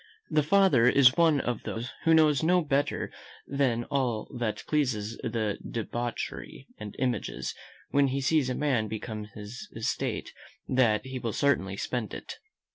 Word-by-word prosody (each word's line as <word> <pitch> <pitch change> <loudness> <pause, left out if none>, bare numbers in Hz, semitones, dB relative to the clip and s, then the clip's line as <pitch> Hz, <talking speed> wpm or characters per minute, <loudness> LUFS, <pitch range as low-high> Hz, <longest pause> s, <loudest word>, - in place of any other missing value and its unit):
The 155 - +4
father 150 -7 +4
is 130 0 +6
one 165 -4 +4
of 120 -2 -2
those 120 +4 -5
who 165 0 +6
knows 155 -3 +4
no 175 +2 +3
better 145 -1 0 0.3
than 135 -4 +1
that - - -8
all 125 -6 0
pleasure 120 +5 -3 0.2
is 105 +2 -6 0.5
debauchery, 120 +1 -4
and 105 -1 -7
imagines, 125 -2 -2 0.4
when 140 0 +4
he 135 +1 -1
sees 140 -1 +2
a 125 - -1
man 130 -7 +1
become 110 0 -5
his 105 +3 -8
estate, 110 -1 -2 0.3
that 120 -4 +2
he 130 -1 -5
will 115 -3 -3
certainly 100 -9 +1
spend 120 -1 -3
it. - - -8
125 Hz, 150 wpm, -28 LUFS, 115-140 Hz, 0.5 s, is